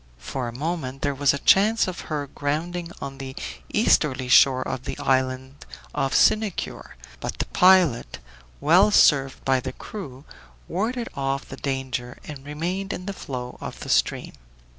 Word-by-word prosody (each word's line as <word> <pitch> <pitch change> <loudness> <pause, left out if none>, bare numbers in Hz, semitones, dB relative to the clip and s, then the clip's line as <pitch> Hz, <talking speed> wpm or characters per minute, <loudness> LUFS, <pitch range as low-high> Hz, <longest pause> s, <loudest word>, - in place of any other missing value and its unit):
For 125 - -4
a - - -4
moment 145 -3 -3
there 145 - +1
was 140 0 +3
a 140 - -2
chance 215 +3 +5
of 180 -1 -5
her 150 -2 -2
grounding 165 +5 -3
on 135 0 -7
the 135 -1 -7 0.4
easterly 130 -3 +2
shore 130 0 +5
of 130 - -4
the - - -4
island 130 +1 -1 0.3
of 135 0 -1
Sinicure; 215 -4 +1 0.2
but - - -5
the - - -1
pilot, 180 - +4 0.4
well 180 +8 +5
served 135 -9 +4
by 130 -1 +3
the 130 +1 -5
crew, 140 -9 -9 0.4
warded 230 +7 -2
off 135 -1 -2
the - - -8
danger 130 -3 -3
and 145 -3 -9
remained 175 +7 -3
in 180 - -6
the 200 - -4
flow 125 -8 -7
of - - -7
the - - -7
stream. - - +1
140 Hz, 160 wpm, -24 LUFS, 130-175 Hz, 0.4 s, chance